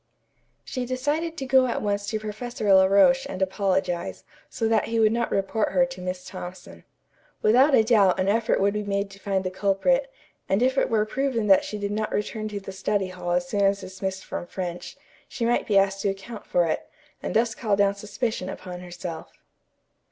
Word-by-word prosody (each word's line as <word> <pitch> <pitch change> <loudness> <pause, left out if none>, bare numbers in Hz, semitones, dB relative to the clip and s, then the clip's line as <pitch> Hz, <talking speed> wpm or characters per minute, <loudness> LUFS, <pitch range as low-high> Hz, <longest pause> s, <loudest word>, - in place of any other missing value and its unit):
She 255 -2 -4
decided 295 +6 -1
to 270 - -4
go 260 0 +4
at 235 - -1
once 205 -1 -1
to 215 0 -2
Professor 215 0 -1
La 190 0 +7
Roche 265 +8 +4
and 185 - -5
apologize, 190 -2 -1 0.3
so 225 - -1
that 225 -1 +2
he 230 0 -1
would 215 -1 +5
not 235 +1 0
report 200 +2 0
her 265 - +4
to 265 -8 -9
Miss 180 0 -4
Thompson. 180 -1 -9 0.6
Without 260 +6 +5
a 220 - +5
doubt 210 -5 +4
an 185 - +1
effort 225 +3 +2
would 200 +1 +2
be 210 - -1
made 200 -1 -2
to 195 - -13
find 195 -2 -1
the 185 - -3
culprit, 205 - +1 0.4
and 195 +5 +2
if 260 +1 +2
it - - +2
were 215 -2 +2
proven 250 -1 -1
that 195 -2 +5
she 210 - -5
did 205 0 -3
not 215 +1 -2
return 215 +1 -2
to 210 -1 -4
the 195 0 -8
study 190 0 -1
hall 180 -1 -6
as 175 0 +1
soon 200 +3 -1
as 200 0 +2
dismissed 190 0 -5
from 175 - -5
French, 180 -2 -6 0.3
she 240 -4 -3
might 240 +1 +1
be 205 - +3
asked 195 0 +2
to 200 - +1
account 195 +3 -7
for 175 -1 +2
it, 160 - -2 0.3
and - - -4
thus 225 +1 +2
call 215 -4 0
down 200 0 +3
suspicion 210 0 -3
upon 180 -2 -7
herself. 175 -2 -7
205 Hz, 205 wpm, -25 LUFS, 190-230 Hz, 0.6 s, La